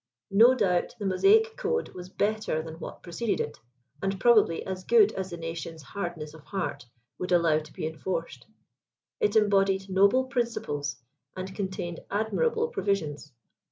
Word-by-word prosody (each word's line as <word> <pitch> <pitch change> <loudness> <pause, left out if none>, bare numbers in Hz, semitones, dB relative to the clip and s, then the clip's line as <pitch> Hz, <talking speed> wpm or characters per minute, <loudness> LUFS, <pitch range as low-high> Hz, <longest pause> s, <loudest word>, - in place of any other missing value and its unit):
No 230 +6 +7
doubt 185 -7 +1
the 205 - -5
Mosaic 425 - +4
code 475 -1 -1
was 180 0 -9
better 205 -6 -1
than 160 0 -9
what - - -8
preceded 205 +6 -2
it; 150 - -4 0.4
and 195 0 -1
probably 215 -8 +4
as 185 -1 -5
good 440 - +5
as 190 0 -4
the 170 - -6
nation's 165 -1 -6
'• - - -18
hard 175 +2 -4
ness 150 -1 -7
of 160 -2 -14
heart" 190 -10 -4 0.3
would 180 - -3
allow 165 -3 +4
to 155 0 -12
be - - -5
enforced. 160 -2 -4 0.7
It 430 -3 +1
embodied 195 -2 +3
noble 200 +7 +4
principles, 235 - -2 0.4
and 190 +1 -5
contained 190 -4 -4
admirable 455 - 0
provisions. 155 - -2
190 Hz, 160 wpm, -28 LUFS, 165-220 Hz, 0.7 s, No